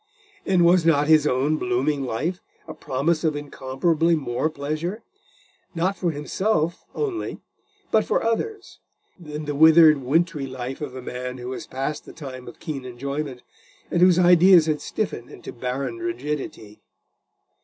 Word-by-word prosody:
And 180 -3 +4
was 175 0 +5
not 150 -3 +3
his 155 -1 +5
own 140 +4 +1
blooming 135 +3 0
life 155 +10 -2 0.3
a - - -6
promise 155 +5 -1
of 155 -2 +1
incomparably 145 +4 0
more 135 0 -1
pleasure, 155 +8 -4 0.7
not 185 +4 0
for 180 - -1
himself 165 +3 -1
only, 395 -6 -3 0.5
but 220 - +4
for - - 0
others, 385 - -3 0.4
than 150 -2 -7
the 145 - -2
withered 160 +1 +7
wintry 150 +2 0
life 130 +1 -6
of 135 -4 -5
a 130 - -7
man 125 +1 -5
who 125 0 -7
was 130 - -6
past 135 +3 -4
the - - -11
time 130 -5 -9
of 120 - -11
keen 140 -4 -5
enjoyment, 135 +1 -5 0.5
and 175 - +1
whose 180 -1 +6
ideas 180 -1 +6
had 155 -2 -1
stiffened 160 - -4
into - - -10
barren 130 - -4
rigidity? 150 - -5
150 Hz, 150 wpm, -23 LUFS, 130-170 Hz, 0.7 s, withered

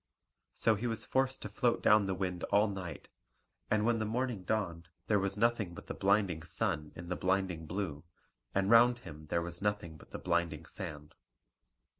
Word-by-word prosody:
So 115 - +3
he 110 +3 -2
was 115 -1 -2
forced 130 0 0
to - - -3
float 120 -3 +1
down 105 -2 +5
the 95 - 0
wind 90 -2 -3
all 105 +2 +4
night; 95 -4 -6 0.6
and 110 0 +2
when 115 -1 +2
the - - 0
morning 120 -2 -1
dawned 90 -5 -2 0.2
there 105 -2 +3
was 100 +1 0
nothing 110 -5 +1
but - - -10
the - - -5
blinding 100 -4 +2
sun 80 -2 -2
in 85 0 -8
the 90 - 0
blinding 90 -4 0
blue; 85 -5 -3 0.5
and 100 +2 +2
round 120 +1 +7
him 75 -2 -9
there 85 +2 0
was 85 0 -5
nothing 105 -6 -1
but - - -16
the - - -6
blinding 85 -3 -1
sand. 75 -7 -7
95 Hz, 185 wpm, -33 LUFS, 85-110 Hz, 0.6 s, round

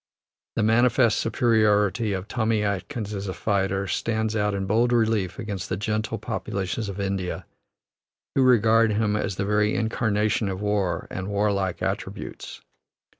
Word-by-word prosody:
The 110 - +1
manifest 120 +1 +3
superiority 110 -2 +2
of 95 0 -3
Tommy 110 -3 0
Atkins 100 +1 -3
as 100 0 -4
a 95 - -4
fighter 100 -1 0
stands 110 +2 -1
out 105 -1 +1
in 95 -1 -2
bold 115 +5 +2
relief 110 -5 +1
against 100 -4 -5
the 95 - -1
gentle 110 +1 -2
populations 100 +2 -3
of 100 0 -6
India, 95 -2 -3 0.9
who 135 - +2
regard 115 -3 +4
him 105 0 +1
as 100 -2 -2
the 100 - -2
very 105 +1 +2
incarnation 110 -2 0
of 95 -1 -4
war 105 -3 -1
and 95 0 -4
warlike 100 -2 0
attributes. - - -5
105 Hz, 145 wpm, -25 LUFS, 100-110 Hz, 0.9 s, regard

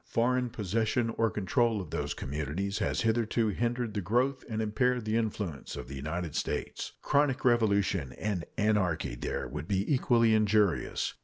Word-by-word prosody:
Foreign 125 +1 +1
possession 115 +2 0
or 115 0 +1
control 110 +2 +1
of 90 -6 -7
those - - -2
communities 75 +8 -3
has - - 0
hitherto 115 0 +1
hindered 120 +2 -1
the 105 - -1
growth 125 +8 +1
and 110 -1 -2
impaired 115 +2 +1
the 110 +1 0
influence 105 -9 -2
of - - -7
the 65 - -8
United 80 +4 -4
States. - - -3
Chronic 140 -2 +2
revolution 100 - +2
and 100 -5 -2
anarchy 105 - +1
there - - -3
would 80 - -6
be 100 0 0
equally 115 -3 +4
injurious. 105 -3 +2
110 Hz, 155 wpm, -30 LUFS, 95-120 Hz, -, equally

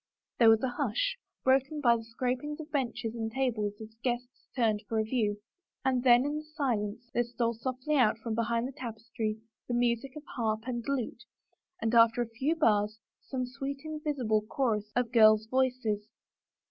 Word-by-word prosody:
There 230 -2 +8
was 225 +1 +5
a - - +3
hush, - - 0 0.3
broken 270 +3 +2
by 240 -5 +5
the 225 - -4
scrapings 255 +6 -3
of 310 0 -8
benches 235 -5 -1
and 225 -1 -3
tables 230 -5 0
as 220 -1 -8
the 220 - -30
guests 245 +1 -3
turned 220 -5 +2
for 225 - 0
a 220 - +3
view, 215 -3 0 0.5
and 260 -2 +2
then 245 0 +6
in 295 +1 -1
the - - -8
silence 245 -7 -2
there 240 - +2
stole 235 -1 -1
softy 255 +5 -3
out 220 -4 +4
from 225 0 -4
behind 230 +1 0
the - - -6
tapestry 225 -3 -4 0.3
the 240 - -1
music 240 +2 0
of 300 - -8
harp 220 -2 0
and 240 -2 -3
lute, 275 -4 -2 0.5
and 225 +1 -1
after 230 +1 +6
a - - -7
few 265 +8 0
bars 215 -8 +2 0.2
some 255 -2 -3
sweet 270 +3 -5
invis 300 -1 -3
ible 215 -4 +1
chorus 215 -5 0
of 245 -1 +1
girls' 215 -2 +6
voices. 245 -4 0
240 Hz, 185 wpm, -30 LUFS, 225-265 Hz, 0.5 s, There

